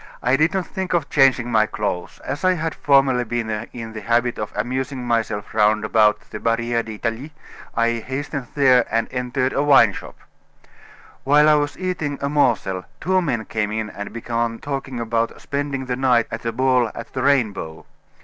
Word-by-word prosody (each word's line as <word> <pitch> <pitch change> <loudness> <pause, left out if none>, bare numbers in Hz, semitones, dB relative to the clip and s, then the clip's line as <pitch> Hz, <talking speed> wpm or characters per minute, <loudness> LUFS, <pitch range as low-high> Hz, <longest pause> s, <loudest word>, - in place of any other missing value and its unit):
I 125 +2 +3
did 155 +4 +3
not 190 -2 -1
think 190 +1 -4
of 165 -5 -1
changing 130 -3 +3
my 110 -2 +3
clothes. 100 -5 -4
As 140 +5 -4
I 185 0 +4
had 165 -2 -2
formerly 135 -3 +3
been 120 -1 -3 0.2
in 115 -2 -7
the 110 - -6
habit 120 +3 +1
of 105 - -4
amusing 130 +4 -3
myself 115 -3 -1
round 105 0 +3
about 110 -1 +3
the 105 - -6
Barriere 115 +1 0
d'Italie, 115 +5 -5 0.5
I 115 0 +2
hastened 135 +1 -5
there 130 -4 +5
and 115 +1 0
entered 130 +1 -1
a 140 - +1
wine 135 -8 +6
shop. - - -9 1.1
While 150 +2 +5
I 155 - +6
was 145 -1 0
eating 170 -6 -3
a 140 - -2
morsel, 120 -10 +1
two 185 +1 +1
men 120 -10 -2
came 105 -1 -2
in 110 0 -3
and 100 - -7
began 115 0 -2
talking 135 -2 -5
about 115 0 -1
spending 140 -2 -3
the 125 -1 -2
night 125 -3 +3
at 115 +1 -6
a 115 - 0
ball 125 0 +2
at 115 - -8
the 130 - -2
Rainbow. 110 - 0
125 Hz, 180 wpm, -21 LUFS, 115-140 Hz, 1.1 s, wine